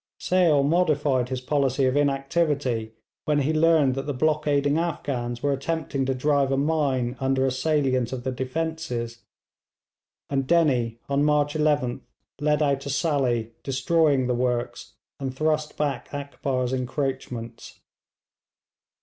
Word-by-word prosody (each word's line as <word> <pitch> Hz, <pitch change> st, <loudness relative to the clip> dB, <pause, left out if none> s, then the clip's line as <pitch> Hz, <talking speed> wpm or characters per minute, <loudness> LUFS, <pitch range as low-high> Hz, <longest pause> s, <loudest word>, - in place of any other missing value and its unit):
Sale 170 Hz, -6 st, +3 dB
modified 145 Hz, -5 st, +2 dB
his 130 Hz, -1 st, -3 dB
policy 135 Hz, -1 st, +1 dB
of 130 Hz, +1 st, +1 dB
inactivity 135 Hz, -5 st, 0 dB, 0.3 s
when 150 Hz, -1 st, +2 dB
he 145 Hz, +3 st, 0 dB
learned 155 Hz, -4 st, +4 dB
that 135 Hz, +2 st, -4 dB
the 145 Hz, -, -2 dB
blockading 150 Hz, 0 st, +1 dB
Afghans 125 Hz, -8 st, -3 dB
were 145 Hz, -1 st, +2 dB
attempting 140 Hz, -1 st, -2 dB
to 135 Hz, -, 0 dB
drive 140 Hz, 0 st, +1 dB
a 135 Hz, -, +1 dB
mine 135 Hz, -4 st, 0 dB
under 135 Hz, 0 st, +1 dB
a 135 Hz, -, +1 dB
salient 130 Hz, -3 st, 0 dB
of 130 Hz, -2 st, -5 dB
the 130 Hz, -, -1 dB
defences, 130 Hz, -3 st, -3 dB, 1.1 s
and 135 Hz, -2 st, -1 dB
Dennie 130 Hz, -9 st, +2 dB
on 140 Hz, +1 st, +1 dB
March 150 Hz, -1 st, +2 dB
11th 150 Hz, -5 st, +1 dB, 0.4 s
led 150 Hz, +1 st, +2 dB
out 140 Hz, -1 st, +1 dB
a -, -, -5 dB
sally, 130 Hz, -6 st, 0 dB
destroyed 140 Hz, 0 st, +2 dB
the 125 Hz, -, 0 dB
works, 120 Hz, -1 st, -2 dB, 0.3 s
and 135 Hz, -2 st, -4 dB
thrust 155 Hz, +1 st, -1 dB
back 140 Hz, -4 st, -2 dB
Akbar's 135 Hz, -3 st, -2 dB
encroachments. 125 Hz, -3 st, -4 dB
140 Hz, 130 wpm, -25 LUFS, 130-150 Hz, 1.1 s, learned